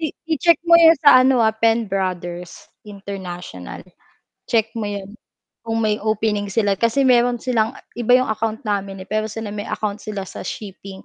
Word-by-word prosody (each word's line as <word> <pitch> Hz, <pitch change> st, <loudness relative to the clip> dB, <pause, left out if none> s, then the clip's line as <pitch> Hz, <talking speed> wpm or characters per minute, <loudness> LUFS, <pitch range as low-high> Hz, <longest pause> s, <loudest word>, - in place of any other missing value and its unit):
I 320 Hz, -, -1 dB, 0.2 s
i-check 335 Hz, +1 st, +3 dB
mo 340 Hz, 0 st, +5 dB
'yon 330 Hz, -1 st, +7 dB
sa 270 Hz, -3 st, +8 dB
ano, 255 Hz, -2 st, +3 dB
ah, 220 Hz, -, +3 dB
Penbrothers 190 Hz, -6 st, -2 dB, 0.2 s
International, 185 Hz, -, -8 dB, 0.7 s
check 225 Hz, -1 st, +1 dB
mo 225 Hz, -2 st, -4 dB
'yon, 200 Hz, -1 st, -6 dB, 0.5 s
kung 225 Hz, 0 st, -2 dB
may 210 Hz, 0 st, 0 dB
opening 215 Hz, -1 st, -1 dB
sila, 200 Hz, 0 st, +1 dB
kasi 230 Hz, +4 st, +2 dB
meron 245 Hz, -1 st, +3 dB
silang 235 Hz, -1 st, -1 dB, 0.2 s
iba 245 Hz, +1 st, +4 dB
'yong 255 Hz, -2 st, 0 dB
account 220 Hz, 0 st, -2 dB
namin, 195 Hz, -2 st, -3 dB
eh, -, -, -29 dB
pero 215 Hz, 0 st, -1 dB
sila 215 Hz, -1 st, -6 dB
may 205 Hz, 0 st, -6 dB
account 210 Hz, -1 st, -3 dB
sila 205 Hz, -2 st, -5 dB
sa -, -, -9 dB
shipping, 195 Hz, -2 st, -8 dB
215 Hz, 170 wpm, -20 LUFS, 200-230 Hz, 0.7 s, sa